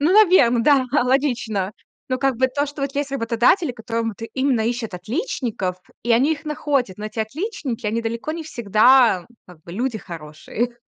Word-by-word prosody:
Ну, 315 Hz, +6 st, +3 dB
наверно, 350 Hz, -, +5 dB
да, 280 Hz, -2 st, +4 dB
да, 295 Hz, -, +4 dB
логично. 240 Hz, -7 st, 0 dB, 0.4 s
Ну 255 Hz, -1 st, -1 dB
как 270 Hz, -3 st, +1 dB
бы 260 Hz, -, +3 dB
то, 285 Hz, +3 st, -1 dB
что 290 Hz, 0 st, -7 dB
вот 275 Hz, 0 st, -3 dB
есть 285 Hz, -1 st, -2 dB
работодатели, 245 Hz, -, +2 dB
которые 230 Hz, 0 st, -3 dB
вот 225 Hz, -3 st, -4 dB, 0.2 s
именно 260 Hz, -3 st, +1 dB
ищут 235 Hz, -3 st, -2 dB
отличников, 220 Hz, -, -3 dB, 0.3 s
и 235 Hz, +1 st, +1 dB
они 270 Hz, +7 st, +4 dB
их 290 Hz, 0 st, -6 dB
находят, 280 Hz, -9 st, -1 dB
но 210 Hz, -, -4 dB
эти 215 Hz, -, -9 dB
отличники, 260 Hz, -, -4 dB
они 230 Hz, +2 st, -1 dB
далеко 230 Hz, +7 st, -3 dB
не 330 Hz, -, -5 dB
всегда, 235 Hz, -, +4 dB, 0.2 s
как 170 Hz, -3 st, -16 dB
бы, 170 Hz, -, -11 dB
люди 235 Hz, +2 st, -2 dB
хорошие, 170 Hz, +8 st, -5 dB
245 Hz, 180 wpm, -22 LUFS, 220-280 Hz, 0.4 s, наверно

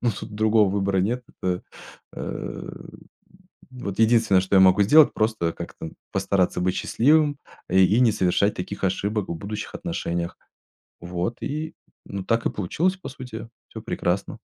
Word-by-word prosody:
но 120 Hz, -, +3 dB
тут 105 Hz, -, -7 dB
другого 110 Hz, -2 st, +3 dB
выбора 100 Hz, -1 st, 0 dB
нет. 120 Hz, +7 st, 0 dB, 0.2 s
Это, 90 Hz, -1 st, -1 dB, 0.5 s
э, -, -, -6 dB, 1.0 s
вот 115 Hz, -6 st, -6 dB
единственное, 110 Hz, -4 st, +4 dB
что 95 Hz, +1 st, +1 dB
я -, -, +7 dB
могу 95 Hz, +2 st, +6 dB
сделать- 150 Hz, +9 st, +6 dB
просто 110 Hz, -6 st, 0 dB
как-то 80 Hz, -, -8 dB, 0.2 s
постараться 90 Hz, -2 st, +1 dB
быть 90 Hz, +1 st, +1 dB
счастливым, 145 Hz, +3 st, +3 dB, 0.3 s
э, 95 Hz, -, +2 dB
и 100 Hz, +6 st, +4 dB
не 120 Hz, -3 st, +5 dB
совершать 100 Hz, +1 st, +2 dB
таких 100 Hz, +2 st, -5 dB
ошибок 100 Hz, +2 st, -1 dB
в 85 Hz, -, -3 dB
будущих 105 Hz, +5 st, -6 dB
отношениях. 85 Hz, 0 st, -3 dB, 0.6 s
Вот, 90 Hz, +6 st, -4 dB
и, 155 Hz, +2 st, -4 dB, 0.3 s
ну 100 Hz, -1 st, -5 dB
так 115 Hz, +2 st, 0 dB
и -, -, +1 dB
получилось, 170 Hz, -, -1 dB
по 185 Hz, -, -9 dB
сути, 120 Hz, -4 st, -8 dB, 0.2 s
всё -, -, -8 dB
прекрасно. 90 Hz, +3 st, -2 dB
100 Hz, 155 wpm, -24 LUFS, 95-115 Hz, 1.0 s, я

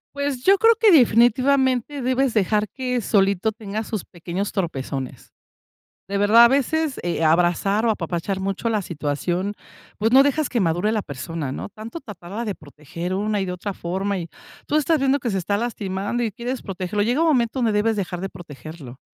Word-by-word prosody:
Pues, 280 Hz, -3 st, -2 dB
yo 390 Hz, +4 st, +5 dB
creo 455 Hz, 0 st, +6 dB
que 440 Hz, -3 st, +6 dB
definitivamente 260 Hz, +1 st, +3 dB
debes 255 Hz, 0 st, +1 dB
dejar 210 Hz, 0 st, +1 dB
que 250 Hz, -2 st, -2 dB
solito 200 Hz, 0 st, +2 dB
tenga 215 Hz, -1 st, -5 dB
sus 215 Hz, -2 st, -5 dB
pequeños 175 Hz, +4 st, -4 dB
tropezones, 135 Hz, -, -4 dB, 0.7 s
de 200 Hz, +1 st, -2 dB
verdad. 215 Hz, +4 st, +7 dB
A -, -, +8 dB
veces, 280 Hz, +3 st, 0 dB
eh, 170 Hz, -1 st, -1 dB
abrazar 175 Hz, +6 st, +2 dB
o 230 Hz, -, +4 dB
apapachar 180 Hz, 0 st, -3 dB
mucho 195 Hz, +4 st, -2 dB
la 220 Hz, -2 st, +1 dB
situación, 175 Hz, +4 st, -2 dB, 0.5 s
pues, 225 Hz, +2 st, +1 dB
no 270 Hz, +1 st, +8 dB
dejas 285 Hz, +1 st, +1 dB
que 240 Hz, -, 0 dB
madure 175 Hz, +3 st, +1 dB
la 215 Hz, -2 st, -1 dB
persona, 145 Hz, +1 st, -5 dB
¿no? -, -, -6 dB
Tanto 225 Hz, +9 st, -8 dB
tratarla 210 Hz, -, -7 dB
de 205 Hz, -3 st, -3 dB
proteger 155 Hz, +4 st, -7 dB
una 210 Hz, +2 st, 0 dB
y 190 Hz, -, -1 dB
de 180 Hz, -, -4 dB
otra 185 Hz, +2 st, -5 dB
forma, 190 Hz, +3 st, -2 dB
y 170 Hz, -2 st, -5 dB, 0.4 s
tú 295 Hz, -, -1 dB
estás 310 Hz, +1 st, +3 dB
viendo 275 Hz, 0 st, +2 dB
que 245 Hz, -, -2 dB
se 195 Hz, -, -1 dB
está 190 Hz, +3 st, -1 dB
lastimando 205 Hz, 0 st, -2 dB
y 225 Hz, -, -1 dB
quieres 240 Hz, +5 st, -5 dB
protegerlo. 190 Hz, +1 st, -2 dB
Llega 245 Hz, +8 st, +1 dB
un 335 Hz, -, +3 dB
momento 255 Hz, -4 st, +1 dB
donde 235 Hz, -3 st, +2 dB
debes 215 Hz, +2 st, +1 dB
dejar 185 Hz, -3 st, -3 dB
de 195 Hz, +2 st, -4 dB
protegerlo, 155 Hz, -6 st, -11 dB
210 Hz, 190 wpm, -22 LUFS, 180-245 Hz, 0.7 s, A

